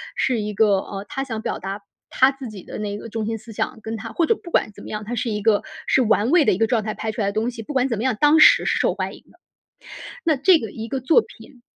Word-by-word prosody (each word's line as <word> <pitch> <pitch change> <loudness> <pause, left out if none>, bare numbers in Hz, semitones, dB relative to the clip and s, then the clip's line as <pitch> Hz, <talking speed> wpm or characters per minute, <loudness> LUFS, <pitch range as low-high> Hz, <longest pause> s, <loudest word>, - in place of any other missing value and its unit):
是 255 -3 +1
一 210 0 -4
个 205 -2 +4
呃， 195 +1 -7
他 270 -2 -3
想 225 -4 -5
表 - - -3
达 195 +2 -5 0.3
他 260 +1 +4
自 270 -3 -8
己 200 -4 -10
的 - - -8
那 205 -1 -3
个 230 - -9
中 225 0 -4
心 225 0 -2
思 225 +1 -12
想， 215 - -3
跟 220 +1 -4
他 225 +1 -7
或 335 - +2
者 450 - +2
不 345 - -12
管 220 - +1
怎 - - -13
么 - - -9
样， 210 0 -4
他 235 - -5
是 240 0 -2
一 210 -2 -3
个 215 -2 +3 0.2
是 - - +3
玩 225 0 +2
味 345 -2 +6
的 - - +3
一 - - -2
个 225 - +3
状 225 -1 0
态 215 0 -4
拍 220 - -3
出 220 - -4
来 200 - +1
的 200 - -2
东 220 +3 -1
西， 230 -2 -8
不 220 - -8
管 265 -2 +1
怎 230 -5 -2
么 - - -2
样， 255 -4 0
当 300 +2 +5
时 - - +7
是 - - +1
受 - - +1
欢 - - -3
迎 - - -17
的。 - - -24 0.9
那 310 -4 +2
这 360 +6 +5
个 220 - -6
一 225 +1 -7
个 265 +3 -3
作 315 - +4
品， 255 - -16
225 Hz, 325 characters per minute, -22 LUFS, 210-265 Hz, 0.9 s, 时